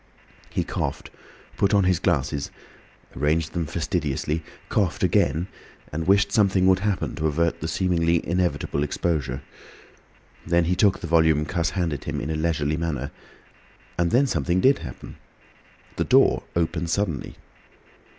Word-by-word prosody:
He - - -1
coughed, - - -4 0.5
put 100 +1 +3
on 100 - +4
his 90 -2 +2
glasses, 75 -5 0 0.7
arranged 75 +4 0
them 85 -3 -2
fastidiously, 80 -2 -2 0.3
coughed 95 -7 0
again, 80 +6 +2 0.5
and 80 +2 -3
wished 100 +1 +4
something 100 -3 +3
would 95 0 +5
happen 100 -1 -1
to 80 - 0
avert 85 +2 0
the 80 - -2
seemingly 85 -1 +1
inevitable 85 -4 0
exposure. 70 -3 -1 1.0
Then 85 0 +2
he 90 +2 +1
took 100 0 +3
the - - -4
volume 80 -2 +3
Cuss 85 0 -1
handed 80 -6 -1
him - - -3
in 75 - -3
a - - -1
leisurely 75 -1 0
manner. 75 -5 -3 0.8
And 85 -1 +1
then 130 +8 +4
something 85 - 0
did 135 +8 +4
happen. 65 - -9 0.8
The - - +1
door - - +4
opened 85 0 -1
suddenly. 85 -8 -2
85 Hz, 140 wpm, -24 LUFS, 75-90 Hz, 1.0 s, would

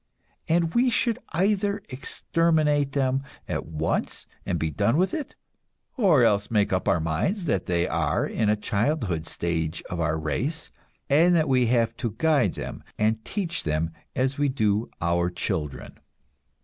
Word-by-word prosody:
And 165 0 +2
we 250 +2 +4
should 235 -1 +1
either 200 +3 +1
exterminate 150 +1 +1
them 135 -1 +1 0.3
at - - -3
once 80 0 -2 0.2
and 85 - 0
be 80 -1 -1
done 100 - +1
with 185 +2 +2
it, 305 -3 -4 0.6
or 180 - +4
else 105 -3 +2
make 105 -3 +2
up 95 - 0
our 85 - +3
minds 85 - -1
that 100 - 0
they 85 -1 +1
are - - 0
in 110 - 0
a 105 - +4
childhood 105 - -1
stage 85 -1 -2
of 85 - -3
our 80 -1 0
race, 125 - -2 0.4
and 165 +5 +5
that 160 -2 +3
we 130 -3 +3
have 115 -1 +2
to 115 -4 -3
guide 145 - +2
them - - -6
and 110 +1 +1
teach 175 -5 -2
them 80 +1 -1 0.2
as 130 +2 0
we 145 -1 +2
do 110 -4 0
our 85 +1 +1
children. 75 -4 -4
115 Hz, 160 wpm, -25 LUFS, -, 0.6 s, and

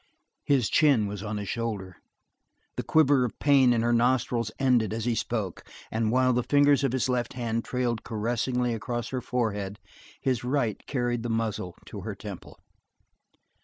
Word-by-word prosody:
His 135 -6 +2
chin 140 -9 +4
was 100 -1 -5
on 105 +1 -4
his 100 -1 -5
shoulder; 100 -7 -4 0.8
the - - -2
quiver 145 -4 +4
of 120 - -3
pain 135 -3 +5
in 115 -1 +2
her 120 0 +2
nostrils 120 -1 +1
ended 125 -5 +2
as 115 0 -3
he 120 - +1
spoke; 110 -5 -3 0.3
and 110 0 0
while 130 +1 +3
the 125 - +2
fingers 145 +1 +4
of 135 - +2
his 130 -1 0
left 125 -2 -1
hand 115 -2 -2
trailed 125 -2 -2
caressingly 120 +2 -1
across 120 +1 -3
her 130 -1 -3
forehead, 105 -5 -2 0.4
his 125 -3 -1
right 125 -4 -1
carried 120 -3 -1
the 120 - -4
muzzle 110 -6 -2
to 100 - -8
her 105 +1 -5
temple. 100 -2 -9
120 Hz, 165 wpm, -27 LUFS, 110-125 Hz, 0.8 s, pain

